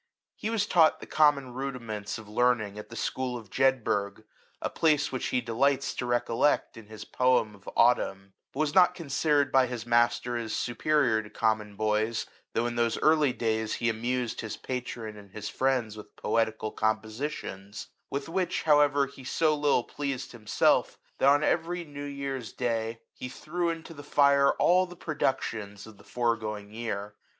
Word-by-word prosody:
He 215 Hz, -, -4 dB
was 225 Hz, -3 st, +1 dB
taught 165 Hz, -6 st, +4 dB
the -, -, -9 dB
common 145 Hz, -4 st, +3 dB
rudiments 120 Hz, -6 st, -4 dB
of 110 Hz, -1 st, -11 dB
learning 110 Hz, -2 st, +1 dB
at 105 Hz, -, -10 dB
the 115 Hz, -, -9 dB
school 125 Hz, +2 st, -2 dB
of 110 Hz, -5 st, -12 dB
Jedburg, 110 Hz, -6 st, +1 dB, 0.4 s
a -, -, -2 dB
place 150 Hz, -2 st, +2 dB
which 130 Hz, -, -2 dB
he 125 Hz, -, 0 dB
delights 130 Hz, +4 st, +1 dB
to 125 Hz, -, -4 dB
recollect 120 Hz, +3 st, +1 dB
in 115 Hz, -2 st, -12 dB
his 110 Hz, 0 st, -9 dB
poem 125 Hz, -4 st, +2 dB
of 100 Hz, -1 st, -11 dB
" -, -, -34 dB
Autumn;" 100 Hz, -5 st, +2 dB, 0.2 s
but 140 Hz, -, -3 dB
was 150 Hz, -1 st, 0 dB
not 180 Hz, -2 st, +5 dB
considered 145 Hz, -2 st, +1 dB
by 130 Hz, -1 st, +4 dB
his 120 Hz, -2 st, -5 dB
master 120 Hz, +1 st, +2 dB
as 115 Hz, -2 st, -4 dB
superior 120 Hz, -2 st, +1 dB
to 105 Hz, -, -12 dB
common 110 Hz, -2 st, -1 dB
boys, 110 Hz, +1 st, 0 dB, 0.3 s
though 115 Hz, -, +1 dB
in 120 Hz, 0 st, -3 dB
those 115 Hz, -1 st, +1 dB
early 155 Hz, -3 st, +4 dB
days 110 Hz, -2 st, -1 dB
he 120 Hz, -, 0 dB
amused 120 Hz, +1 st, -2 dB
his 110 Hz, -2 st, -5 dB
patron 120 Hz, -4 st, -5 dB
and 100 Hz, -1 st, -13 dB
his 110 Hz, -1 st, -5 dB
friends 125 Hz, -5 st, 0 dB
with 105 Hz, -1 st, -12 dB
poetical 110 Hz, 0 st, -1 dB
compo 110 Hz, 0 st, 0 dB
sitions; 110 Hz, -5 st, -6 dB, 0.2 s
with 140 Hz, 0 st, -3 dB
which, 180 Hz, +2 st, -1 dB
however, 145 Hz, -2 st, +4 dB
he 135 Hz, -1 st, -13 dB
so 155 Hz, +4 st, +2 dB
little 145 Hz, -4 st, +2 dB
pleased 140 Hz, -2 st, -4 dB
himself, 110 Hz, -3 st, +1 dB, 0.2 s
that 135 Hz, -, +5 dB
on 145 Hz, +2 st, +4 dB
every 175 Hz, +2 st, 0 dB
new 145 Hz, -1 st, -8 dB
year's 140 Hz, -5 st, -5 dB
Via 125 Hz, -, -4 dB
LIFE -, -, +2 dB
OF -, -, +1 dB
THOMSON. 110 Hz, 0 st, -3 dB
day 115 Hz, -, -30 dB
he 125 Hz, -, -7 dB
threw 170 Hz, +6 st, -2 dB
into 165 Hz, 0 st, -5 dB
the 145 Hz, -, -10 dB
fire 140 Hz, -1 st, +4 dB
all 185 Hz, +1 st, +3 dB
the 175 Hz, 0 st, -12 dB
produc 150 Hz, -5 st, 0 dB
tions 105 Hz, -2 st, -6 dB
of 110 Hz, -2 st, -14 dB
the -, -, -16 dB
foregoing 110 Hz, -4 st, -2 dB
year. 105 Hz, -3 st, -4 dB
120 Hz, 185 wpm, -28 LUFS, 110-140 Hz, 0.4 s, not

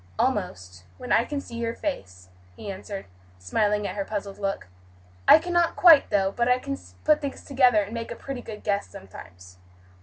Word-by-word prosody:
"Almost, 90 Hz, 0 st, -2 dB
when -, -, -7 dB
I 230 Hz, -, +4 dB
can 290 Hz, -1 st, -3 dB
see 235 Hz, -4 st, -9 dB
your 230 Hz, 0 st, -2 dB
face," 90 Hz, -, -6 dB, 0.3 s
he 200 Hz, -, -7 dB
answered, 195 Hz, +1 st, -7 dB, 0.3 s
smiling 205 Hz, -, 0 dB
at -, -, -4 dB
her 200 Hz, -, -2 dB
puzzled 200 Hz, -1 st, -5 dB
look. 195 Hz, -, -3 dB, 0.6 s
"I -, -, +10 dB
cannot 345 Hz, +1 st, 0 dB
quite, 325 Hz, -6 st, +7 dB
though; 195 Hz, -1 st, +1 dB
but 235 Hz, +3 st, 0 dB
I 250 Hz, -, +4 dB
can 275 Hz, +2 st, -4 dB, 0.3 s
put 305 Hz, -1 st, +3 dB
things 280 Hz, -2 st, -5 dB
together 250 Hz, -6 st, +4 dB
and 200 Hz, +3 st, -9 dB
make 230 Hz, -1 st, -5 dB
a 235 Hz, -, -5 dB
pretty 270 Hz, -1 st, -7 dB
good 215 Hz, -3 st, -9 dB
guess, 200 Hz, -1 st, -1 dB
sometimes." 90 Hz, -1 st, -13 dB
210 Hz, 185 wpm, -25 LUFS, 195-270 Hz, 0.6 s, I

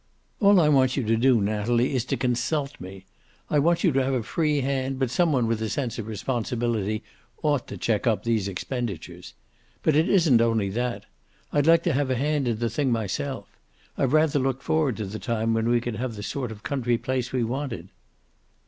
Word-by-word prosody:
"All 200 Hz, -2 st, +6 dB
I 160 Hz, -, +4 dB
want 130 Hz, -3 st, +3 dB
you 135 Hz, -, +1 dB
to 115 Hz, +1 st, +2 dB
do, 120 Hz, +1 st, +4 dB
Natalie, 110 Hz, +5 st, +1 dB
is 125 Hz, -2 st, 0 dB
to -, -, -1 dB
consult 135 Hz, +3 st, -1 dB
me. 95 Hz, +1 st, -10 dB, 0.5 s
I 150 Hz, -, +4 dB
want 170 Hz, +3 st, +2 dB
you 175 Hz, -, +4 dB
to 135 Hz, -1 st, +2 dB
have 135 Hz, 0 st, 0 dB
a 120 Hz, -, -1 dB
free 150 Hz, +3 st, 0 dB
hand, 135 Hz, 0 st, -1 dB
but 130 Hz, -2 st, -1 dB
some 170 Hz, +3 st, +2 dB
one 125 Hz, -5 st, +2 dB
with 115 Hz, -1 st, -1 dB
a 110 Hz, -, -1 dB
sense 125 Hz, -2 st, -3 dB
of 110 Hz, -, -5 dB
responsibility 115 Hz, -2 st, -2 dB, 0.4 s
ought 145 Hz, -4 st, +1 dB
to -, -, -7 dB
check 115 Hz, +1 st, 0 dB
up 110 Hz, -2 st, +1 dB
these 115 Hz, -4 st, 0 dB
expenditures. 95 Hz, -, -5 dB, 0.5 s
But 155 Hz, -, +3 dB
it 155 Hz, +3 st, +3 dB
isn't 160 Hz, -12 st, +4 dB
only 115 Hz, -4 st, +1 dB
that. 120 Hz, +4 st, -3 dB, 0.5 s
I'd 145 Hz, 0 st, +2 dB
like 165 Hz, 0 st, +6 dB
to -, -, +1 dB
have 140 Hz, 0 st, 0 dB
a 130 Hz, -, +1 dB
hand 145 Hz, +1 st, 0 dB
in 115 Hz, -2 st, 0 dB
the 120 Hz, +1 st, -1 dB
thing 135 Hz, +1 st, 0 dB
myself. 115 Hz, +4 st, -2 dB, 0.5 s
I've 135 Hz, -1 st, 0 dB
rather 155 Hz, -2 st, +3 dB
looked 135 Hz, 0 st, -1 dB
forward 150 Hz, -7 st, +1 dB
to 110 Hz, -, -3 dB
the 105 Hz, +3 st, -6 dB
time 115 Hz, -1 st, -1 dB
when 115 Hz, +1 st, +1 dB
we 120 Hz, 0 st, +3 dB
could 120 Hz, -2 st, -4 dB
have 125 Hz, -2 st, -3 dB
the 105 Hz, -, -7 dB
sort 125 Hz, 0 st, -3 dB
of 105 Hz, -1 st, -10 dB
country 120 Hz, -4 st, 0 dB
place 130 Hz, 0 st, -2 dB
we 125 Hz, -2 st, 0 dB
wanted." 120 Hz, -6 st, -4 dB
125 Hz, 210 wpm, -25 LUFS, 115-140 Hz, 0.5 s, All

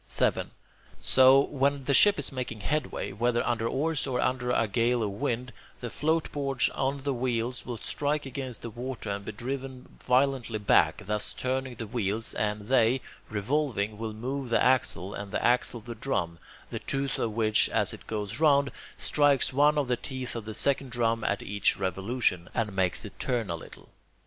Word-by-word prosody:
7. -, -, +1 dB, 0.5 s
So, 130 Hz, +1 st, +6 dB
when 140 Hz, 0 st, 0 dB
a 140 Hz, -, +3 dB
ship 205 Hz, +9 st, +6 dB
is 145 Hz, -, -1 dB
making 125 Hz, -5 st, -5 dB
headway, 150 Hz, +8 st, -2 dB
whether 120 Hz, +4 st, 0 dB
under 115 Hz, -1 st, 0 dB
oars 145 Hz, +3 st, -1 dB
or 125 Hz, -2 st, -1 dB
under 125 Hz, -1 st, 0 dB
a 115 Hz, -2 st, +2 dB
gale 115 Hz, +3 st, +1 dB
of 105 Hz, -, -1 dB
wind, 120 Hz, +5 st, -3 dB, 0.3 s
the 120 Hz, -2 st, -5 dB
floatboards 145 Hz, -4 st, 0 dB
on 135 Hz, 0 st, -2 dB
the 140 Hz, -1 st, 0 dB
wheels 125 Hz, 0 st, -2 dB
will 120 Hz, -2 st, -4 dB
strike 145 Hz, +5 st, -1 dB
against 130 Hz, -3 st, -6 dB
the 115 Hz, -, -5 dB
water 120 Hz, -2 st, -5 dB
and 100 Hz, 0 st, -4 dB
be -, -, -4 dB
driven 130 Hz, +3 st, -6 dB
violently 125 Hz, -3 st, +1 dB
back, 100 Hz, -3 st, +3 dB
thus 105 Hz, +1 st, -2 dB
turning 130 Hz, 0 st, -2 dB
the 115 Hz, -, -5 dB
wheels; 110 Hz, 0 st, -1 dB
and 105 Hz, 0 st, -1 dB
they, 120 Hz, +2 st, +3 dB, 0.3 s
revolving, 110 Hz, -1 st, -1 dB
will 110 Hz, -1 st, -3 dB
move 130 Hz, +4 st, -4 dB
the 115 Hz, -, +3 dB
axle, 110 Hz, -7 st, +3 dB
and 100 Hz, -1 st, -6 dB
the -, -, -1 dB
axle 120 Hz, -1 st, +3 dB
the 120 Hz, +2 st, -7 dB
drum, 85 Hz, -9 st, -2 dB, 0.3 s
the -, -, -3 dB
tooth 135 Hz, -1 st, -2 dB
of 110 Hz, -2 st, -1 dB
which, 110 Hz, -1 st, +2 dB
as -, -, 0 dB
it -, -, -12 dB
goes 105 Hz, +2 st, -3 dB
round, 140 Hz, -3 st, +4 dB, 0.3 s
strikes 145 Hz, -3 st, +3 dB
one 145 Hz, +2 st, +4 dB
of 145 Hz, -3 st, +1 dB
the 125 Hz, -1 st, +1 dB
teeth 130 Hz, -1 st, -5 dB
of 115 Hz, -2 st, -5 dB
the 110 Hz, -1 st, -5 dB
second 140 Hz, -1 st, +1 dB
drum 115 Hz, -2 st, 0 dB
at -, -, -1 dB
each 100 Hz, 0 st, +1 dB
revolution, 95 Hz, 0 st, 0 dB
and 105 Hz, -4 st, -1 dB
makes 95 Hz, -2 st, +1 dB
it -, -, -11 dB
turn 115 Hz, -7 st, -1 dB
a -, -, -1 dB
little. 80 Hz, -, -12 dB
125 Hz, 185 wpm, -28 LUFS, 110-135 Hz, 0.5 s, So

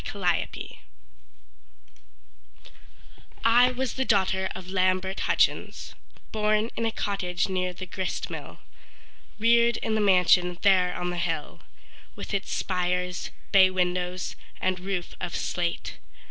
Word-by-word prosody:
Lillian -, -, +1 dB
Stewart -, -, -8 dB, 2.7 s
I 245 Hz, +2 st, +6 dB
was 255 Hz, 0 st, -2 dB
the 265 Hz, -, -1 dB
daughter 190 Hz, -4 st, +1 dB
of 190 Hz, -1 st, -8 dB
Lambert 185 Hz, 0 st, 0 dB
Hutchins, -, -, +1 dB, 0.4 s
Born 215 Hz, +1 st, +1 dB
in 230 Hz, -, 0 dB
a -, -, -1 dB
cottage 180 Hz, -4 st, -1 dB
near 185 Hz, -1 st, -1 dB
the 185 Hz, +1 st, -7 dB
grist 185 Hz, +1 st, -3 dB
mill, -, -, -8 dB, 0.8 s
Reared 235 Hz, +1 st, +4 dB
in 220 Hz, -, -2 dB
the 220 Hz, -, +1 dB
mansion 180 Hz, -2 st, +4 dB
there 185 Hz, -2 st, +4 dB
on 180 Hz, 0 st, -2 dB
the 175 Hz, -, -4 dB
hill, -, -, -3 dB, 0.6 s
With -, -, -7 dB
its 200 Hz, 0 st, -2 dB
spires, 180 Hz, 0 st, -1 dB, 0.2 s
bay 190 Hz, -1 st, +7 dB
windows, 180 Hz, 0 st, -1 dB, 0.2 s
and 185 Hz, 0 st, 0 dB
roof 185 Hz, -1 st, -4 dB
of 170 Hz, -, -3 dB
slate. 175 Hz, -1 st, -3 dB
185 Hz, 125 wpm, -26 LUFS, 180-210 Hz, 2.7 s, bay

